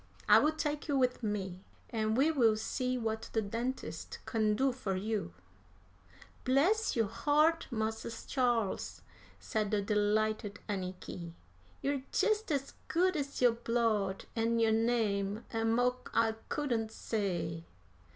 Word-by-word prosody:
I - - +8
will 310 - +3
take 300 -1 -2
you 285 -2 +1
with 250 -1 +2
me, 195 -4 -3 0.3
and 220 0 0
we 295 +5 +4
will 230 -8 +4
see 255 +3 -1
what 220 -1 -3
the 220 - +2
dentist 235 +6 -4
can 215 -2 +1
do 265 +4 +2
for 210 -7 -3
you." 210 - -2 1.1
"Bless 345 +13 +3
yo' 225 -2 +3
heart, 305 +9 +2
Mars' 225 -1 -3
Charles!" 240 -6 0 0.4
said 215 -3 -1
the 210 0 +1
delighted 210 0 +1
Anniky; 185 -3 -5 0.5
"you're 280 -1 0
jest 430 -4 +1
as 275 -2 -1
good 370 +2 +2
as 280 -3 -2
yo' 245 - +7
blood 230 -4 0
and 230 0 +1
yo' 225 -1 +4
name, 220 -2 +1
and 225 0 +1
mo' 250 +1 +2 0.2
I 225 -1 +3 0.2
couldn't 235 -7 -1
say." 175 - -2
225 Hz, 135 wpm, -33 LUFS, 210-260 Hz, 1.1 s, I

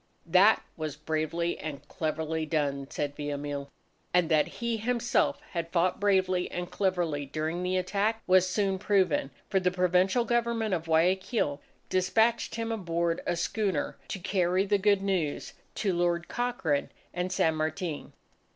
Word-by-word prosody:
"That 185 +6 +5
was 155 -3 -4
bravely 155 +2 -2
and 145 -1 -6
cleverly 160 0 -2
done!" 145 -3 -1
said 145 -1 -3
Villamil. 145 -1 -4 0.5
And 180 -2 +3
that 155 -2 +4
he 235 -1 -3
himself 240 +2 +1
had 170 -2 -3
fought 180 +1 +1
bravely 185 -3 +2
and 175 0 -5
cleverly 175 -7 0
during 155 +4 -2
the 180 +1 0
attack, 205 +4 0
was 185 0 +4
soon 195 -1 0
proven, 185 -9 +2 0.2
for 195 - +2
the 185 -1 +2
Provisional 185 +5 +2
Government 235 -2 0
of 165 -2 -1
Guayaquil 165 - +1 0.3
despatched 220 +5 +2
him 230 0 -2
aboard 170 -5 -1
a 175 - +1
schooner 190 -2 -1
to - - -4
carry 185 0 +1
the 205 0 +2
good 200 0 +3
news 180 -7 -1 0.2
to 195 -4 0
Lord 175 0 0
Cochrane 190 -13 -1 0.2
and 180 +1 -2
San 160 -3 +2
Martin. 155 +1 -3
180 Hz, 145 wpm, -29 LUFS, 160-195 Hz, 0.5 s, That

